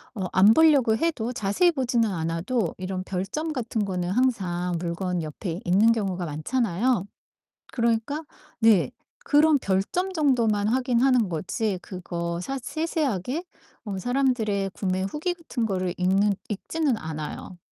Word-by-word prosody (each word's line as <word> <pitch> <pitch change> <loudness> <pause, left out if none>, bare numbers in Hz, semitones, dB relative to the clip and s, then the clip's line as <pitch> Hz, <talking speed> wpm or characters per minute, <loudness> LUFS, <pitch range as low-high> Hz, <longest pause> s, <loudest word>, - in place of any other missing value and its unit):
어 195 -3 -3
안 200 +4 +6
보려고 280 -7 +5
해도 255 -7 -1
자세히 225 - +2
보지는 245 -6 +1
않아도 170 +5 -1
이런 185 0 -4
별점 195 - -3
같은 230 -5 -2
거는 180 -2 -2
항상 185 -6 0
물건 175 +1 -2
옆에 165 +3 -5
있는 200 +6 +5
경우가 195 -6 -1
많잖아요. 200 - 0 0.7
그러니까 235 +6 0 0.4
네 225 -3 +4 0.3
그런 300 +1 +5
별점 205 - 0
정도만 235 - +2
확인하는 250 -2 +2
거지 185 +4 -2
그거 170 -2 -4
사 270 +8 -4
세세하게 300 - -2 0.4
어 200 -2 -4
사람들의 225 -4 0
구매 185 -1 -1
후기 300 - -2
같은 330 -9 -3
거를 185 -4 -1
읽는 195 +3 +3 0.2
읽지는 265 +5 -1
않아요. 155 +2 -6
215 Hz, 290 characters per minute, -25 LUFS, 185-255 Hz, 0.7 s, 안